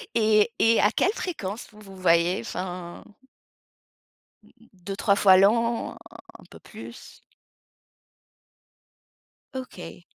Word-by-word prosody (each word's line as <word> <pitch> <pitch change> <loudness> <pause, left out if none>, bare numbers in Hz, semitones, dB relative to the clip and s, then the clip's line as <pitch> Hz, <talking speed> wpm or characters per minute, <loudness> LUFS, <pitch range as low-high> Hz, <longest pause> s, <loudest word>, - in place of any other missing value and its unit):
et 215 0 +3
et 225 0 +4
à 205 - +4
quelle 390 - +1
fréquence 230 - -5
vous 215 - -17
vous 195 -2 -13
voyez? 170 0 +2
Enfin 180 +5 -7 1.7
2-3 195 +2 -1
fois 190 -2 +6
l'an? 230 +4 +2 0.5
Un - - -16
peu - - -14
plus? - - -12 2.3
OK. 250 -9 -9
200 Hz, 95 wpm, -25 LUFS, 185-225 Hz, 2.3 s, fois